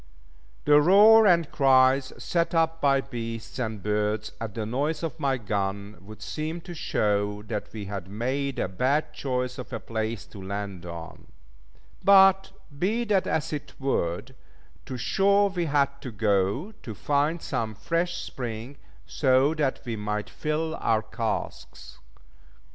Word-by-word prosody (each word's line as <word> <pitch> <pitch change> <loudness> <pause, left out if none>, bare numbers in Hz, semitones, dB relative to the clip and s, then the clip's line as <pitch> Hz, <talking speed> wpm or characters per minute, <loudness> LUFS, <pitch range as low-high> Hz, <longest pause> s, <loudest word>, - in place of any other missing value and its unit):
The 150 0 +6
roar 210 +6 +7
and 170 -4 +3
cries 130 -1 +4
set 170 0 -1
up 165 0 +1
by 135 -1 +3
beasts 115 -2 -6
and 110 -5 -3
birds 105 0 -1
at 110 -3 -5
the 110 - -3
noise 145 +9 -1
of 160 0 -4
my 135 -3 +1
gun 100 -2 -3
would 105 +1 -11
seem 155 +2 -4
to 175 +1 -9
show 105 -8 -1
that 105 -1 -5
we 105 -2 -6
had 95 -2 -6
made 130 +6 -2
a - - 0
bad 140 +11 0
choice 125 -1 -3
of 125 - -8
a - - -3
place 110 -2 -4
to 100 - -12
land 95 -2 -5
on; 85 -1 -9 0.8
but 195 -1 +6 0.3
be 220 +6 +1
that 205 -5 +1
as 155 0 -1
it 145 - -5
would, 130 -3 -1 0.5
to 130 - -5
shore 200 +9 +3
we 175 -2 -1
had 140 -2 +1
to 135 - -6
go 105 - 0
to 110 - -7
find 145 - 0
some 110 -2 -2
fresh 170 - -1
spring, 120 +2 -6 0.3
so 130 - +3
that 150 -4 -1
we 120 -2 -3
might 105 +1 -3
fill 160 +1 -2
our 110 -1 +2
casks. 110 +1 -5
130 Hz, 150 wpm, -26 LUFS, 105-155 Hz, 0.8 s, roar